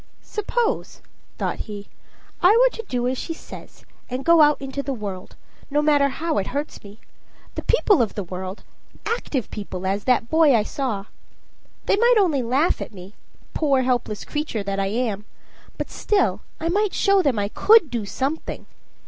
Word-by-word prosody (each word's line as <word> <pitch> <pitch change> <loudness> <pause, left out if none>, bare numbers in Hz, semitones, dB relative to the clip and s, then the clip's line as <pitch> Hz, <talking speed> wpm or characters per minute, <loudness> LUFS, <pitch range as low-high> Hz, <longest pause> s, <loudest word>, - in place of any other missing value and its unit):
"Suppose," 450 +3 -2 0.4
thought - - -2
he, 205 -1 -7 0.5
"I 385 +6 +6
were - - +4
to 455 - -5
do 245 -1 0
as 255 0 -1
she 330 - -4
says, - - -12 0.2
and 255 +2 -4
go 335 -1 +6
out 295 0 +5
in 270 -1 -6
the 280 0 -3
world, 200 -5 -7 0.3
no 295 +1 +1
matter 290 -2 +4
how 315 +2 -1
it 190 - -3
hurts 295 +1 -5
me 205 +1 -13 0.5
the - - -4 0.3
world 400 - +6
of 225 - -1
people, 185 +1 -5 0.5
active 300 - -2
people, 190 -3 -6
as 195 +2 -1
that 250 -3 +2
boy 315 -2 +5
I 215 - +3
saw. 220 -5 -3 0.8
They - - +3
might 475 +3 +5
only 335 -10 +3
laugh 260 +8 +1
at 210 - -7
me 185 +2 -11 0.4
poor 275 -4 +2
helpless 245 -4 -1
creature 295 -8 -3
that 195 0 -2
I 195 - 0
am; 210 -1 -2 0.5
but - - -4
still 415 -2 +1 0.2
I 325 - -2
might 405 +3 +1
show 395 -1 +4
them 275 -9 +1
I 200 0 0
could 420 - +5
do 235 -3 -2
something. 275 +9 -3
265 Hz, 175 wpm, -23 LUFS, 210-330 Hz, 0.8 s, I